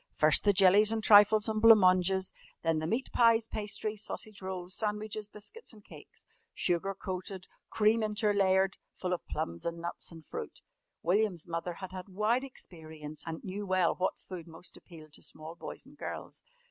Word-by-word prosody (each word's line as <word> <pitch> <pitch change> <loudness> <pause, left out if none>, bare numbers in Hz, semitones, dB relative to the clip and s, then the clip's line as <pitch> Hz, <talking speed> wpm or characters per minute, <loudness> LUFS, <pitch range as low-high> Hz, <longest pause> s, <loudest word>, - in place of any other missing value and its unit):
First 155 0 +4
the 205 - +6
jellies 200 +3 +6
and 225 -1 -1
trifles 210 +1 +7
and 215 -1 -1
blanc 225 0 +9
manges, 185 0 +3 0.3
then 165 -1 +1
the 155 - -3
meat 230 +8 -2
pies, 230 -1 +4
pastries, 215 0 -3
sausage 215 -1 -5
rolls, 185 -1 -5
sandwiches, 210 0 -3
biscuits, 215 - -10
and 210 -2 -17
cakes - - -14 0.3
sugar 190 +2 -1
coated, 185 0 -5 0.2
cream 220 +1 +3
interlayered, 200 -3 +2 0.2
full 180 -1 -2
of 180 - -3
plums 85 0 -4
and 170 0 -3
nuts 170 +1 -6
and 165 -2 -12
fruit. - - -7 0.4
William's 180 -1 +1
mother 170 +1 -3
had 190 +1 -8
had 185 +1 -8
wide 215 +7 +1
experience 155 - -7
and 160 0 -5
knew 200 +2 -5
well 185 -2 +2
what 185 - -1
food 175 -3 -9
most 165 +2 -10
appealed 155 -4 -14
to - - -12
small 155 +1 -9
boys - - -9
and - - -18
girls. - - -7
190 Hz, 170 wpm, -31 LUFS, 170-215 Hz, 0.4 s, blanc